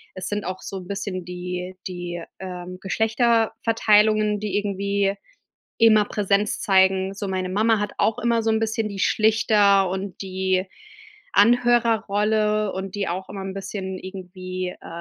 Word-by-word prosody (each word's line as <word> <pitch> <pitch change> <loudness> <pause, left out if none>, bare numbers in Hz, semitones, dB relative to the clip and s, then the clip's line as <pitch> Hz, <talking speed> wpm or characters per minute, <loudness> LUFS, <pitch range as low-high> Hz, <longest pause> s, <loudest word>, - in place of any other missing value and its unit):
es 185 - -5
sind 205 -2 -3
auch 185 +1 -5
so 195 - -6
'n 180 -1 -9
bisschen 195 -3 -4
die 180 +1 -5
die, 175 -1 -5 0.2
ähm, 180 -1 -7
Geschlechterverteilungen, 220 -1 +2
die 205 -1 -2
irgendwie 200 -1 0 0.6
immer 215 -2 +5
Präsenz 205 0 0
zeigen. 190 0 +3
So, 200 0 -4
meine 185 -1 -2
Mama 215 +3 +2
hat 210 - -2
auch 225 +1 +1
immer 235 -2 +1
so 225 - +1
'n 220 - +2
bisschen 220 0 -1
die 195 -1 -7
Schlichter 205 -3 +3
und 190 +1 -5
die 190 0 -1 0.7
Anhörerrolle 215 -2 +3
und 190 +1 -5
die 200 -3 -2
auch 185 +2 -4
immer 195 -1 -6
'n 190 0 -5
bisschen 190 -1 -5
irgendwie, 185 -1 -6
äh, - - -11
200 Hz, 150 wpm, -23 LUFS, 185-215 Hz, 0.7 s, immer